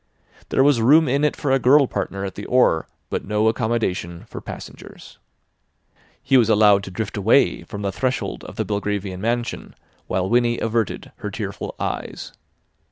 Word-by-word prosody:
There 135 - +3
was 140 -5 +4
room 150 +7 +5
in 140 +3 +1
it 150 - +2
for 140 - -2
a 135 - +4
girl 140 +3 +5
partner 100 -5 -4
at 95 - -5
the 105 - -8
oar, 125 -10 +3 0.2
but - - -2
no 105 +2 +1
accommodation 110 -6 -1
for - - -9
passengers. - - -11 1.0
He 135 - +4
was 115 -3 +4
allowed 105 -2 +5
to - - -7
drift 105 +3 -4
away 110 +7 +3
from 100 -2 -7
the 100 - -1
threshold 130 +6 -2
of - - -10
the - - -2
Belgravian 100 -2 -3
mansion 120 +2 -3 0.3
while 95 0 -1
Winnie 120 +1 +2
averted 115 -1 -2
her - - -5
tearful - - -5
eyes. - - -5
110 Hz, 165 wpm, -22 LUFS, 100-125 Hz, 1.0 s, room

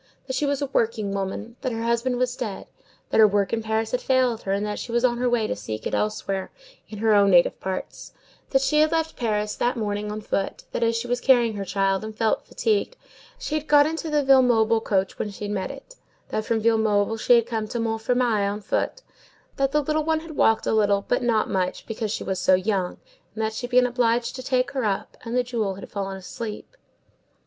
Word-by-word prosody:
That 260 - -4
she 290 - 0
was 285 0 0
a 280 - -4
working 220 -3 0
woman; 200 +4 -4
that 260 -2 -2
her 225 0 -3
husband 235 +2 0
was 250 0 0
dead; 215 -7 -5 0.5
that - - +2
her 215 - +9
work 200 0 0
in 225 - 0
Paris 220 0 -1
had 250 - -1
failed 255 -3 +2
her, 195 - -3
and 200 +1 0
that 210 0 -3
she 235 - -6
was 240 +1 +2
on 240 -1 +1
her 250 0 +1
way 240 -2 +1
to - - -2
seek 110 +1 -6
it - - -3
elsewhere, 195 -2 -2 0.4
in 215 - -8
her 220 +1 +3
own 200 -1 +5
native 175 -2 +4
parts; 190 0 -5 0.4
that 270 -1 +2
she 300 +2 +2
had 310 0 +4
left 325 -1 0
Paris 210 -3 -1
that 245 +1 0
morning 210 -1 -2
on 210 - -4
foot; 200 -2 -3
that, - - -3
as 230 0 +2
she 230 +1 -2
was 245 0 -1
carrying 240 -4 +4
her 200 -1 -4
child, 195 +1 0
and 215 0 -7
felt 220 -2 0
fatigued, 445 +3 -1 0.4
she - - -5
had 310 0 -2
got 290 -1 +6
into 325 +1 -3
the 300 -1 +2
Villemomble 235 -4 +4
coach 195 -2 0
when 210 - -2
she 205 +1 -6
met 205 -2 -2
it; 275 - -10 0.4
that 215 - -2
from 225 -1 0
Villemomble 220 -1 +2
she 245 - +5
had 235 -1 +3
come 225 -2 -3
to 235 - -4
Montfermeil 225 -2 +1
on 210 +1 -5
foot; - - -2 0.5
that 275 0 +1
the 300 +1 +2
little 310 +2 0
one 315 0 0
had 320 -2 -10
walked 225 -4 +3
a - - +1
little, 205 -2 +2
but 245 - +1
not 230 -3 +1
much, 185 -2 -2
because 225 -1 -3
she - - -3
was 190 -1 -2
so 185 - +5
young, 185 -1 -1 0.4
and 220 - -2
that 220 0 -1
she 245 +2 -4
had - - -23
been 250 0 +5
obliged 240 -1 +1
to 260 - -6
take 255 -1 0
her 265 -3 -2
up, 200 -3 -2
and 235 +1 -2
the 250 - +3
jewel 225 -6 -2
had 195 - -10
fallen 195 -1 -4
asleep. 215 - -7
225 Hz, 235 wpm, -24 LUFS, 210-250 Hz, 0.5 s, her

